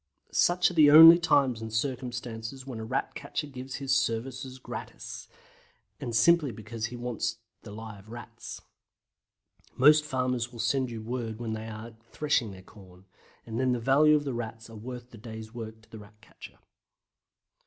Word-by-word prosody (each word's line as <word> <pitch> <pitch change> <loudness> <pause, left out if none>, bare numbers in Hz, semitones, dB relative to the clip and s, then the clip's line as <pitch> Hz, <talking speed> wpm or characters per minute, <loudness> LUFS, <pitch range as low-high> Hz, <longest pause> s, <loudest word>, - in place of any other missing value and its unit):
Such 175 0 +3
are - - -8
the 155 -3 +7
only 165 +3 +11
times 140 -8 +2
and 110 0 -6
circumstances 125 0 -4
when 125 -4 -6
a - - -5
Rat 110 - -2
catcher 150 - -4
gives 130 -2 -8
his 135 -1 0
services 130 +1 -2
gratis, 125 - -8 0.7
and 120 - -4
simply 170 0 +4
because 115 0 -5
he 120 - -8
wants 120 -1 -3 0.2
the - - -11
live 105 -1 -10
Rats. 120 -1 -9 1.2
Most 150 +3 +6
farmers 125 -4 -1
will 120 - -11
send 125 +3 0
you 115 -2 -7
word 115 -2 -4
when 115 -2 -3
they 110 0 -5
are 110 +1 -8 0.2
threshing 145 -7 0
their 95 -1 -11
corn, 95 -2 -17 0.4
and 115 +1 -4
then 130 -1 +2
the 120 - -1
value 145 +6 +5
of 150 - +1
the 135 -3 -3
Rats 115 -1 -6
are - - -11
worth 125 +2 -8
the 115 - -12
day's 110 0 -9
work 110 -2 -8
to - - -23
the 110 - -9
Rat 105 +1 -16
catcher. 110 - -14
120 Hz, 175 wpm, -28 LUFS, 110-135 Hz, 1.2 s, only